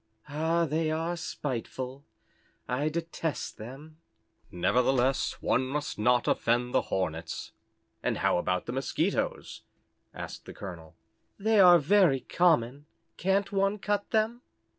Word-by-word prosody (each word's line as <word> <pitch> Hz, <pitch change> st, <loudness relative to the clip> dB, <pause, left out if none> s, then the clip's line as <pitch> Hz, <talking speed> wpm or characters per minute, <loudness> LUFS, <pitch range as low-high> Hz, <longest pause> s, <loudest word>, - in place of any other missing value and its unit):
"Ah, 160 Hz, +3 st, +1 dB
they 155 Hz, +1 st, 0 dB
are 165 Hz, +2 st, -1 dB
spiteful, 130 Hz, -3 st, -5 dB, 0.6 s
I 140 Hz, +5 st, 0 dB
detest 165 Hz, -1 st, -4 dB
them." 135 Hz, +8 st, -10 dB, 0.5 s
"Nevertheless, 125 Hz, +7 st, +2 dB
one 130 Hz, -, +2 dB
must 145 Hz, -2 st, -3 dB
not 125 Hz, +3 st, +3 dB
offend 120 Hz, +1 st, +1 dB
the -, -, +4 dB
Hornets, 80 Hz, -3 st, -3 dB, 0.5 s
and -, -, -1 dB
how -, -, +2 dB
about 90 Hz, 0 st, -1 dB
the -, -, -4 dB
Mosquitoes?" 135 Hz, 0 st, -1 dB, 0.5 s
asked -, -, -8 dB
the -, -, -9 dB
Colonel. 85 Hz, -5 st, -9 dB, 0.4 s
"They 215 Hz, +1 st, +2 dB
are 180 Hz, -2 st, +9 dB
very 165 Hz, -4 st, +4 dB
common. 145 Hz, -5 st, +1 dB, 0.3 s
Can't 195 Hz, +2 st, +1 dB
one 195 Hz, +1 st, +1 dB
cut 205 Hz, 0 st, -1 dB
them?" 225 Hz, +2 st, +1 dB
145 Hz, 120 wpm, -29 LUFS, 125-175 Hz, 0.6 s, are